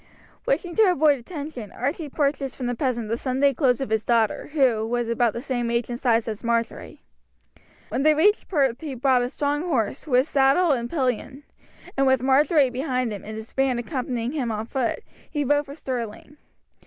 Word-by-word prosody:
Wishing 375 Hz, -8 st, 0 dB
to 435 Hz, -3 st, +6 dB
avoid 295 Hz, -4 st, +3 dB
attention, 285 Hz, -, -7 dB
Archie 285 Hz, +5 st, -3 dB
purchased 280 Hz, -2 st, -1 dB
from 255 Hz, -, -5 dB
the 245 Hz, -, 0 dB
peasant 240 Hz, -3 st, -1 dB
the 230 Hz, +2 st, -2 dB
Sunday 275 Hz, +2 st, +2 dB
clothes 250 Hz, -3 st, +2 dB
of 265 Hz, -, -4 dB
his 220 Hz, -1 st, +1 dB
daughter, 230 Hz, -3 st, +1 dB
who 255 Hz, -7 st, +3 dB
was 240 Hz, +1 st, -1 dB
about 235 Hz, -1 st, +1 dB
the 235 Hz, -, -6 dB
same 245 Hz, -4 st, -2 dB
age 235 Hz, +1 st, -1 dB
and 240 Hz, -, -4 dB
size 230 Hz, -3 st, +2 dB
as 215 Hz, 0 st, -5 dB
Marjory. 230 Hz, -1 st, -2 dB, 0.9 s
When -, -, -1 dB
they 305 Hz, +1 st, +4 dB
reached 410 Hz, +8 st, +3 dB
Perth 270 Hz, -7 st, +1 dB
he 295 Hz, -4 st, -5 dB
bought 255 Hz, 0 st, +3 dB
a 245 Hz, -, -1 dB
strong 290 Hz, +2 st, -1 dB
horse, 270 Hz, -, -1 dB
with 255 Hz, 0 st, +3 dB
saddle 280 Hz, +5 st, +3 dB
and 240 Hz, -3 st, -1 dB
pillion; 260 Hz, -1 st, -2 dB, 0.5 s
and 275 Hz, 0 st, +2 dB
with 260 Hz, -1 st, +3 dB
Marjory 275 Hz, +1 st, +4 dB
behind 255 Hz, -2 st, -1 dB
him, 200 Hz, -, -7 dB
and 215 Hz, +1 st, -7 dB
his 220 Hz, +1 st, -10 dB
band 270 Hz, -2 st, +1 dB
accompanying 245 Hz, -2 st, -3 dB
him 265 Hz, -6 st, -2 dB
on 215 Hz, 0 st, -3 dB
foot, 245 Hz, 0 st, -2 dB, 0.3 s
he 295 Hz, -2 st, -1 dB
rode 290 Hz, +2 st, +2 dB
for 280 Hz, -, -8 dB
Stirling. 255 Hz, 0 st, -6 dB
260 Hz, 190 wpm, -24 LUFS, 235-285 Hz, 0.9 s, to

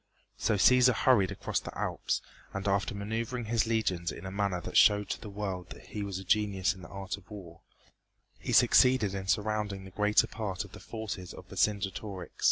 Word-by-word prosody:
So 110 Hz, -, +1 dB
Cæsar 125 Hz, +4 st, +5 dB
hurried 115 Hz, -5 st, +4 dB
across 100 Hz, -, -2 dB
the -, -, -9 dB
Alps -, -, -2 dB, 0.3 s
and 100 Hz, +1 st, -3 dB
after 100 Hz, +1 st, 0 dB
maneuvering 115 Hz, +4 st, -3 dB
his 115 Hz, 0 st, +1 dB
legions 95 Hz, -7 st, 0 dB
in -, -, -9 dB
a 95 Hz, -, -5 dB
manner 100 Hz, -2 st, -1 dB
that -, -, -7 dB
showed 105 Hz, -1 st, +5 dB
to -, -, -4 dB
the 105 Hz, -, -7 dB
world 95 Hz, -4 st, -5 dB
he 105 Hz, -, -6 dB
was 100 Hz, -2 st, -3 dB
a 95 Hz, -, -6 dB
genius 100 Hz, 0 st, +1 dB
in 95 Hz, -, -13 dB
the -, -, -10 dB
art 100 Hz, +1 st, -5 dB
of 100 Hz, -, -18 dB
war, 85 Hz, -6 st, -10 dB, 0.8 s
he -, -, -4 dB
succeeded 125 Hz, -6 st, +5 dB
in 95 Hz, -1 st, -5 dB
surrounding 105 Hz, -1 st, -1 dB
the 95 Hz, -, -11 dB
greater 105 Hz, +2 st, +3 dB
part 100 Hz, -5 st, -4 dB
of -, -, -15 dB
the -, -, -11 dB
forces 105 Hz, -5 st, -6 dB
of -, -, -12 dB
Vercingetorix. 100 Hz, -3 st, -2 dB
100 Hz, 190 wpm, -30 LUFS, 95-110 Hz, 0.8 s, Cæsar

